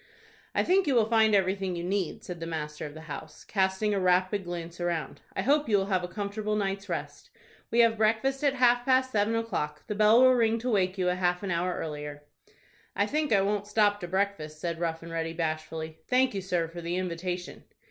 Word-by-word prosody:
"I - - +3
think 375 -1 +3
you 275 - +2
will 230 -2 +5
find 220 -1 +4
everything 190 -1 0
you 170 - -4
need," 190 -1 -2
said 175 -2 -7
the 165 - -5
master 150 -2 -4
of 145 - -12
the 160 - -9
house, 155 0 -9
casting 190 +1 0
a 200 - +1
rapid 185 +2 +2
glance 170 0 -6
around. 170 -5 -2
"I - - -1
hope 290 0 +2
you 205 - +4
will 195 - +1
have 185 -1 +1
a - - -2
comfortable 205 +3 -3
night's 195 -1 -2
rest. 170 - -5 0.4
We 235 - +4
have 230 -1 +4
breakfast 230 +6 +1
at 280 -1 +3
half 245 -1 +4
past 260 0 +2
seven 215 +1 +1
o'clock. 225 -10 -3
The - - -3
bell 215 +4 +5
will 255 0 +7
ring 230 -2 +2
to 240 +3 -3
awake 190 -3 +1
you 185 - 0
half 180 0 +1
an 195 - -2
hour 175 +1 0
earlier." 150 -1 -6 0.7
"I - - +2
think 305 0 -1
I 200 -3 +5
won't 205 +1 -1
stop 205 -1 +2
to 175 - -5
breakfast," 185 -5 -2
said 170 0 -3
Rough 165 -1 -2
and 165 - -9
Ready, 165 0 -2
bashfully; 160 -1 -4
"thank 255 0 +3
you, 195 - -2
sir, 180 -3 -1
for 170 +1 -8
the 170 +1 -3
invitation." 180 0 -4
190 Hz, 220 wpm, -28 LUFS, 170-220 Hz, 0.7 s, will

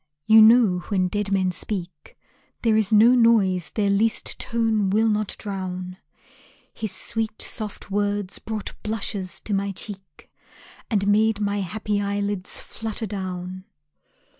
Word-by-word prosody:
You 220 +1 +8
know 220 -4 +6
when 185 -3 +1
dead 205 +1 -2
men 190 -2 +2
speak 175 -4 -5 0.5
There 225 -2 +3
is 215 -1 +2
no 220 +3 +7
noise 215 -8 +3
their 205 -2 0
least 215 +3 0
tone 225 -4 0
will 220 +3 +3
not 215 -1 0
drown. 185 -2 -5 0.8
His 215 -3 -4
sweet 220 +3 -3
soft 210 -2 -5
words 205 -1 -1
brought 215 -2 -5
blushes 205 -3 -4
to 210 - -4
my 200 0 0
cheek, 195 -5 -10 0.6
And 200 -3 +1
made 210 +1 +3
my 205 -1 0
happy 205 +2 -2
eyelids 200 -1 -2
flutter 225 0 -5
down. 185 -2 -5
205 Hz, 135 wpm, -24 LUFS, 190-220 Hz, 0.8 s, You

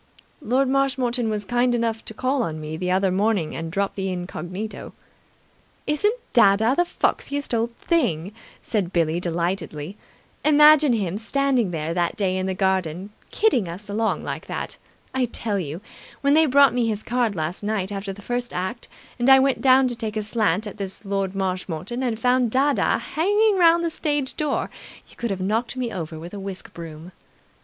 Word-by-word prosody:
"Lord 265 +1 +1
Marshmoreton 260 -3 +1
was 210 -1 -2
kind 245 +3 +2
enough 230 -1 -1
to 220 - -6
call 260 +3 0
on 160 -8 -3
me 155 0 -5
the 180 +3 -3
other 190 +1 +2
morning 195 -4 0
and 165 0 -5
drop 195 +2 -1
the 195 -1 -3
incognito." 180 +3 -6 0.9
"Isn't 415 +10 +1 0.2
dadda 220 +2 +5
the 350 - +3
foxiest 285 -5 -1
old 235 +1 0
thing!" 200 - 0 0.3
said 200 -6 -1
Billie 165 -1 +1
delightedly. 175 0 -3 0.5
"Imagine 300 -2 +6
him 200 -3 -1
standing 260 -2 +1
there 160 -1 -3
that 175 -1 -1
day 190 -3 +1
in 185 0 -1
the 190 - -2
garden, 190 0 -1 0.2
kidding 325 - +2
us 185 +5 -7
along 220 +2 0
like - - -5
that! - - -4 0.4
I 260 -1 +1
tell 220 -3 -2
you, 160 +1 -5 0.4
when 280 0 +3
they 315 +1 +5
brought 280 0 +6
me 245 -2 +1
his 215 -1 -2
card 240 -3 0
last 160 +2 -3
night 205 -2 -2
after 195 0 -4
the 200 +1 -11
first 245 +2 -3
act 190 +7 -3 0.3
and 240 +2 +3
I 265 - +9
went 265 0 +2
down 260 0 +5
to 240 - -3
take 220 -2 -4
a 215 - -1
slant 210 -2 0
at 205 - -7
this 195 +1 -6
Lord 195 -1 -2
Marshmoreton 185 +3 -3
and 235 -4 -1
found 250 0 +2
dadda 275 +4 +2
hanging 415 +6 +2
round 340 0 +5
the 335 - -1
stage 290 -4 -2
door, 300 -2 -1 0.4
you - - -18
could 235 - -3
have 190 -2 -3
knocked 225 +6 -1
me 245 -2 -2
over 160 -2 -5
with 170 +4 -9
a 205 - -5
whisk 195 -1 -7
broom." 165 +1 -9
215 Hz, 180 wpm, -23 LUFS, 185-255 Hz, 0.9 s, I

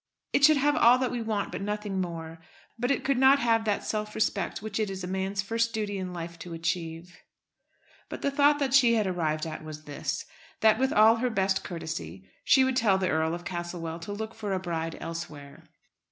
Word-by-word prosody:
It 285 - +2
should 305 +1 +7
have 290 +1 +2
all 240 +2 +6
that 255 -1 -1
we 245 - -3
want, 220 -2 -2
but - - -5
nothing 205 -1 -2
more. 165 -2 -6 0.4
But 245 +1 0
it 275 - +1
could 275 -2 +1
not 265 +1 +7
have 230 -4 +2
that 210 -2 0
self 215 0 -3
respect 200 -4 -1
which 215 0 -4
it 215 -2 0
is 190 -1 -6
a - - -4
man's 190 +1 -2
first 230 +3 0
duty 205 -2 -2
in 185 -1 -4
life 170 -1 -7
to 170 0 -7
achieve." 165 +1 -4 0.9
But - - -7
the 280 - +1
thought 290 +1 +4
that 275 -3 -1
she 245 -4 +6
had 215 -2 +2
arrived 160 -4 -1
at 155 -1 -6
was 155 -1 -8
this, 145 0 -4 0.4
that 220 0 +5
with 265 0 +2
all 220 +2 +6
her 250 +2 0
best 190 -3 0
courtesy 95 - -6 0.2
she 265 - +5
would 260 -1 +1
tell 210 -6 +3
the 190 -1 0
Earl 160 +1 +1
of 175 0 -9
Castlewell 175 -2 -5
to 170 +5 -7
look 220 +2 -5
for 210 -3 -4
a 190 - 0
bride 165 -2 -3
elsewhere. 155 -2 -8
195 Hz, 215 wpm, -28 LUFS, 165-230 Hz, 0.9 s, should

